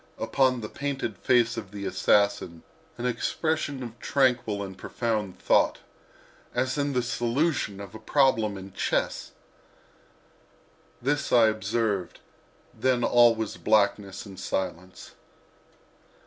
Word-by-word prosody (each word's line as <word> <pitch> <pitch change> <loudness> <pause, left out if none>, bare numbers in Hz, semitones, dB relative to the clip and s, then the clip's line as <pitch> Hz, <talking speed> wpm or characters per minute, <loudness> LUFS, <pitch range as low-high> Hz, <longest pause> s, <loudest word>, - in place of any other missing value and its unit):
—upon 130 -2 +1
the 105 - -4
painted 135 -6 -3
face 120 +3 +2
of 100 - -7
his 100 -1 -4
assassin 100 -5 +2 0.3
an 120 - -4
expression 140 +3 -1
of 120 -1 -9
tranquil 125 -7 +1
and 95 -1 -7
profound 105 -1 -3
thought, - - +3 0.8
as 130 +1 0
in 145 -1 -1
the 125 -1 +1
solution 120 - 0
of 100 -2 -9
a 110 - -9
problem 115 -8 +2
in 95 0 -10
chess! - - -1 1.7
This 145 +2 0
I 115 -2 +6
observed, 105 -3 -2 0.5
then 130 -2 +1
all 120 -1 +5
was 110 -2 -4
blackness 100 -2 +1
and 95 -2 -11
silence. 90 -1 -4
115 Hz, 120 wpm, -27 LUFS, 100-130 Hz, 1.7 s, I